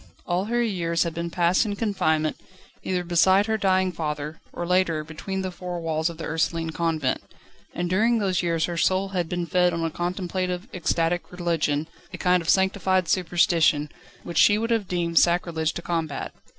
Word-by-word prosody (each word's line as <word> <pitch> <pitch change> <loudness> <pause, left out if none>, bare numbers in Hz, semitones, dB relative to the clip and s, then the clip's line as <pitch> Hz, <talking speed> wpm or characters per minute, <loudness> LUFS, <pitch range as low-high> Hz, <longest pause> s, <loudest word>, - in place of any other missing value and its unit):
All 180 +2 0
her 240 +2 +1
years 170 -6 0
had 170 -2 -3
been 170 +1 -3
passed 175 +3 +2
in 205 -3 -3
confinement, 160 -8 0 0.5
either 180 -1 -1
beside 185 +3 +4
her 220 0 0
dying 190 -3 +2
father 150 -2 -4
or, 175 - -4
later, 175 -3 +1
between 190 +5 -5
the 185 - -3
four 180 0 -5
walls 160 0 -1
of 170 - -9
the 165 - -7
Ursuline 165 0 -1
Convent. 160 -5 -1 0.5
And 175 0 -1
during 220 +6 +2
those 190 -4 0
years 165 -2 +1
her 170 -1 -4
soul 190 +3 +1
had 180 -4 -2
been 175 -1 -2
fed 180 0 +2
on 165 0 -2
a 165 - -1
contemplative, 180 +2 -3
ecstatic 170 0 -1
religion, 165 -4 -1 0.2
a - - -7
kind 180 -1 +2
of 165 - -5
sanctified 190 -2 +2
superstition, 170 -4 +2 0.3
which 170 - -2
she 205 - +6
would 230 +2 -2
have 225 -4 +1
deemed 170 -2 +2
sacrilege 170 -2 +1
to 170 - -6
combat. 165 -5 -3
175 Hz, 180 wpm, -25 LUFS, 165-185 Hz, 0.5 s, she